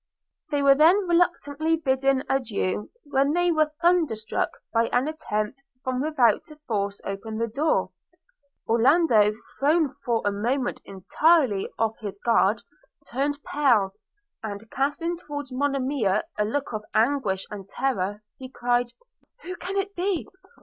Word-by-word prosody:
They 290 Hz, -2 st, 0 dB
were 275 Hz, 0 st, +7 dB
then 345 Hz, +7 st, +4 dB
reluctantly 325 Hz, -3 st, +1 dB
bidding 270 Hz, -3 st, +1 dB
adieu, 210 Hz, -6 st, -1 dB
when 280 Hz, 0 st, +1 dB
they 350 Hz, +1 st, +2 dB
were 310 Hz, -2 st, +2 dB
thunder 340 Hz, -8 st, +3 dB
struck 215 Hz, 0 st, -2 dB, 0.2 s
by 230 Hz, 0 st, +3 dB
an 250 Hz, +3 st, +1 dB
attempt 265 Hz, -4 st, -3 dB, 0.2 s
from 255 Hz, 0 st, -1 dB
without 265 Hz, -8 st, +3 dB
to 310 Hz, -3 st, -13 dB
force 200 Hz, -2 st, -1 dB
open 210 Hz, +3 st, -5 dB
the 230 Hz, -, 0 dB
door. 280 Hz, +8 st, 0 dB, 0.8 s
Orlando, 235 Hz, -2 st, +4 dB, 0.3 s
thrown 300 Hz, 0 st, +3 dB
for 245 Hz, -5 st, -2 dB
a 205 Hz, -, +2 dB
moment 245 Hz, +6 st, -1 dB
entirely 235 Hz, -, +2 dB
off 225 Hz, -1 st, -1 dB
his 205 Hz, -2 st, -6 dB
guard, 225 Hz, -1 st, +2 dB, 0.5 s
turned 285 Hz, +3 st, -1 dB
pale; 235 Hz, -10 st, +2 dB, 0.5 s
and, 215 Hz, 0 st, -7 dB
casting 290 Hz, +5 st, -1 dB
towards 290 Hz, -5 st, -7 dB
Monimia 265 Hz, -6 st, 0 dB
a 210 Hz, -, 0 dB
look 270 Hz, +4 st, -2 dB
of 215 Hz, 0 st, -3 dB
anguish 220 Hz, -5 st, +1 dB
and 200 Hz, -2 st, -8 dB
terror, 210 Hz, -6 st, -2 dB, 0.2 s
he 260 Hz, -1 st, -8 dB
cried, 245 Hz, -1 st, 0 dB, 0.5 s
'Who 365 Hz, +1 st, -6 dB
can 385 Hz, +3 st, -4 dB
it 395 Hz, 0 st, -1 dB
be? 360 Hz, -1 st, -1 dB
265 Hz, 140 wpm, -25 LUFS, 220-300 Hz, 0.8 s, were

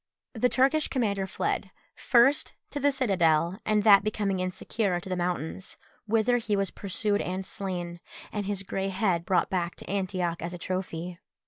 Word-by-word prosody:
The 250 Hz, +1 st, +2 dB
Turkish 275 Hz, +5 st, +3 dB
commander 200 Hz, -7 st, 0 dB
fled, -, -, -2 dB, 0.2 s
first 250 Hz, +4 st, +3 dB, 0.2 s
to 290 Hz, -, -3 dB
the 285 Hz, +1 st, +3 dB
citadel, 185 Hz, -, +2 dB
and 210 Hz, -1 st, +3 dB
that 200 Hz, -2 st, +7 dB
becoming 205 Hz, -3 st, -1 dB
insecure, 185 Hz, +1 st, -1 dB
to 175 Hz, -, -11 dB
the 185 Hz, -, 0 dB
mountains, 175 Hz, 0 st, -3 dB, 0.3 s
whither 225 Hz, +3 st, +3 dB
he 215 Hz, -2 st, -1 dB
was 195 Hz, -2 st, 0 dB
pursued 205 Hz, +1 st, -1 dB
and 185 Hz, +1 st, -3 dB
slain, 175 Hz, -3 st, -4 dB, 0.3 s
and 205 Hz, -2 st, -3 dB
his 200 Hz, -1 st, -2 dB
grey 195 Hz, 0 st, -2 dB
head 185 Hz, -3 st, 0 dB
brought 185 Hz, -, +2 dB
back 175 Hz, -2 st, -1 dB
to -, -, -11 dB
Antioch 185 Hz, -3 st, -1 dB
as 175 Hz, +1 st, -4 dB
a -, -, -6 dB
trophy. 180 Hz, -1 st, -4 dB
195 Hz, 165 wpm, -28 LUFS, 180-215 Hz, 0.3 s, that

